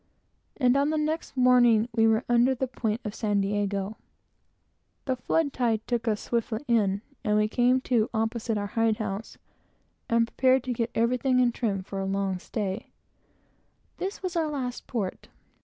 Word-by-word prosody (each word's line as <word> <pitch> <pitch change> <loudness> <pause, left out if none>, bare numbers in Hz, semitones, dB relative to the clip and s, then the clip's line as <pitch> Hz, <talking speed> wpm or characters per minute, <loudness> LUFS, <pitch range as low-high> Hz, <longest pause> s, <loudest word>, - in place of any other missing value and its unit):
And 250 -2 +3
on 280 +1 +2
the 310 - 0
next 310 -1 -2
morning 240 -3 +5
we 225 -1 +4
were 225 +1 +2
under 245 +2 +3
the 265 - -1
high 255 - -16
point 220 +1 0
of 210 - -3
San 210 -3 0
Diego. 200 0 -1 1.1
The 260 - 0
flood 285 +3 0
tide 230 -4 0
took 240 -1 -2
us 210 -2 0
swiftly 230 -1 -2
in, 205 -4 +2 0.2
and 210 0 +2
we 210 0 +3
came 245 +3 +3
to, 235 -4 +1
opposite 225 0 -1
our 205 - -2
hide 225 -1 +2
house, 210 0 -5 0.7
and 230 0 +3
prepared 260 +2 +2
to 255 -1 -2
get 230 0 -1
everything 250 +2 +2
in 245 -1 +4
trim 205 -5 -2
for 195 +1 -6
a 195 - -2
long 195 -1 -1
stay. 205 +1 -4 1.1
This 385 +1 -5
was 365 -2 -3
our 325 -2 +1
last 255 -4 -4
port. 205 -7 -4
230 Hz, 175 wpm, -27 LUFS, 210-255 Hz, 1.1 s, morning